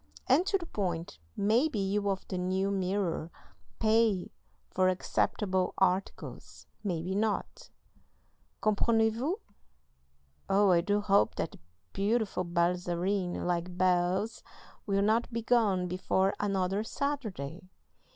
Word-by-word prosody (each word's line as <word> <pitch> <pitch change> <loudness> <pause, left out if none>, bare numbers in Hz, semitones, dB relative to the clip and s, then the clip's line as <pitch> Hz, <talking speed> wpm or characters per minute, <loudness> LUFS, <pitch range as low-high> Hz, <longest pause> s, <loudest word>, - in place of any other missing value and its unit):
"And 320 +9 +3
to 390 - +3
the 350 - -8
point. 175 - -3 0.2
Maybe 230 +7 +2
you 200 +1 0
of 195 -1 -3
the 185 - -3
New 190 +2 0
Mirror 185 -4 -1 0.5
PAY 220 -4 +2 0.4
for 185 0 +3
acceptable 185 0 0
articles, 190 +1 -2 0.2
maybe 180 -2 -2
not. 220 - -2 0.9
Comprenez 220 +1 +3
vous? 290 - -1 1.1
Oh, 200 0 +4
I 170 -1 +5
do 205 +4 +1
hope 200 -1 +3
that - - -4 0.3
beautiful 205 -1 0
balzarine 175 +2 0
like 175 0 -2
Bel's 185 +4 +1 0.5
will 200 0 +2
not 225 +4 +2
be 230 -1 -3
gone 210 -7 +2
before 190 +2 +1
another 195 0 0
Saturday! 200 - -4
195 Hz, 110 wpm, -30 LUFS, 180-215 Hz, 1.1 s, I